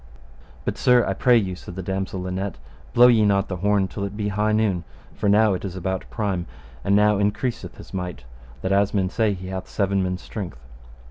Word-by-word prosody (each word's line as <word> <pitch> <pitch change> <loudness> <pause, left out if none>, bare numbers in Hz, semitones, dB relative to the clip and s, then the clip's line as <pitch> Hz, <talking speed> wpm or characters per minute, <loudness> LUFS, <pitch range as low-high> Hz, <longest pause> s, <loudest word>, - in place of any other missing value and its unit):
But, - - -2
sir, 125 -1 +5
I 95 - 0
pray 120 +5 +4
you, 95 -5 -1
said 90 0 -10
the 95 - -5
damosel 95 +1 -3
Linet, 95 0 -3 0.3
blow 120 0 +7
ye 120 -3 +6
not 100 -1 +2
the 90 - -3
horn 100 +1 +2
till 100 - -5
it 100 +1 -4
be 105 -1 -1
high 105 +2 +1
noon, 105 -5 +1 0.3
for 105 - 0
now 105 0 +5
it 90 - -4
is 95 -3 -5
about 95 +1 -3
prime, 100 -6 -2 0.4
and 100 - +3
now 105 0 +4
increaseth 105 +4 -2
his - - -13
might, 90 -9 -4 0.4
that 95 - -1
as 100 +1 +2
men 95 -2 +1
say 110 -3 +1
he 90 0 -8
hath 95 -1 -5
seven 100 -1 +1
men's 90 0 -2
strength. 95 - -6
100 Hz, 210 wpm, -23 LUFS, 95-105 Hz, 0.4 s, blow